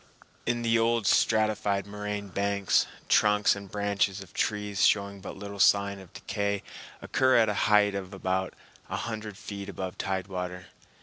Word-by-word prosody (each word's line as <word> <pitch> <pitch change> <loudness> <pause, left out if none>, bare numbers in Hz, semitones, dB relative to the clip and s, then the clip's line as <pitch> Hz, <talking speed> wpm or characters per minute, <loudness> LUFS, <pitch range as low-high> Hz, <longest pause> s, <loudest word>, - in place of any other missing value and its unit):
In 120 0 0
the 115 0 +3
old 115 -1 +2
stratified 105 -2 +2
moraine 105 0 -5
banks, 100 0 +1 0.2
trunks 105 -1 +4
and 100 -1 -9
branches 100 -1 0
of 95 -2 -12
trees 105 -2 -1
showing 100 -1 +2
but - - -8
little 100 0 -8
sign 100 0 +4
of 95 -3 -14
decay 100 -1 -2 0.4
occur 130 -1 +3
at 110 -2 +4
a - - +1 0.2
height 105 -1 +5
of 95 -1 -5
about 95 -1 -2 0.3
a - - -2
hundred 110 -3 -5
feet 100 -1 -7
above 95 -1 -6
tide 95 -2 -2
water. 90 -1 -5
100 Hz, 160 wpm, -28 LUFS, 95-105 Hz, 0.4 s, height